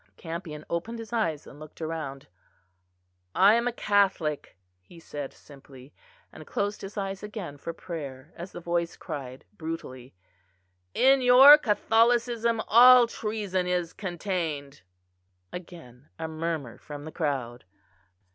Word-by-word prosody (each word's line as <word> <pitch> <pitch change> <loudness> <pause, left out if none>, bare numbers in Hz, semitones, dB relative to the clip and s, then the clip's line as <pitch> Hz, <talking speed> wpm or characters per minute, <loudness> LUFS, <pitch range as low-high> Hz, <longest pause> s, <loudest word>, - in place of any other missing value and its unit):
Campion 165 -2 -7
opened 215 +8 -3
his 225 0 -9
eyes 165 -10 -1
and 145 - -13
looked 155 0 -13
round. 155 -4 -5 1.1
"I 200 +3 +6
am 235 +1 +2
a - - +1
Catholic," 195 - 0 0.2
he 165 - -16
said 145 -4 -7
simply; 135 -1 -16 0.4
and - - -12
closed 205 +1 -2
his 195 +2 -9
eyes 195 -1 -3
again 205 -8 -7
for 165 - -5
prayer, 150 -4 -8
as 175 +3 -8
the - - -8
voice 170 0 -2
cried 135 -5 -7
brutally: 140 - -7 0.8
"In 270 0 +5
your 255 +4 +10
Catholicism 230 0 +2
all 250 +2 +8
treason 210 -5 -3
is 180 -2 -1
contained." 170 - -4 0.7
Again 155 -7 -11
a 160 - -4
murmur 160 -6 -4
from 145 -1 -9
the 155 - -7
crowd. 130 - -3
170 Hz, 130 wpm, -27 LUFS, 150-210 Hz, 1.1 s, your